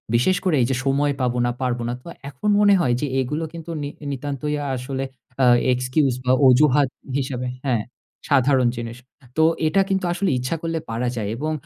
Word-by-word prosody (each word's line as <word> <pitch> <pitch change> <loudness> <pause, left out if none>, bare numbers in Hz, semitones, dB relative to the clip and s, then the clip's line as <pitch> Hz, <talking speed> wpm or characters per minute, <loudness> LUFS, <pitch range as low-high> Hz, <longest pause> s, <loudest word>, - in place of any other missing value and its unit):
বিশেষ 155 +11 +3
করে 180 -4 +2
এইযে, 130 +2 +1
সময় 140 +2 +2
পাবো 125 -1 0
না, 120 - +1
পারব 125 -1 0
না। 120 - -2
তো - - -13 0.2
এখন 145 +10 -3
মনে 205 -1 +6
হয় 125 -7 +2
যে 150 - 0
এগুলো 150 +6 -2
কিন্তু 170 0 -9
নি 145 - -3 0.2
নিতান্তই 145 +2 -3
আ - - -4
আসলে 130 +1 -4 0.4
আ - - +6 0.3
এক্সকিউজ 130 +2 +1
বা 125 - +3 0.2
অজুহাত 135 +2 +5 0.3
হিসাবে 130 -2 -3 0.2
হ্যাঁ, 120 -6 +1 0.5
সাধারণ 135 -2 +4
জিনিস। 115 0 -5 0.4
তো 160 - +5 0.2
এটা 195 +5 +3
কিন্তু 190 -1 0
আসলে 190 +2 0
ইচ্ছা 130 +6 -2
করলে 165 -1 -2
পারা 115 +2 -1
যায় 105 -3 -3
এবং 155 +5 -2
135 Hz, 185 wpm, -22 LUFS, 125-155 Hz, 0.5 s, মনে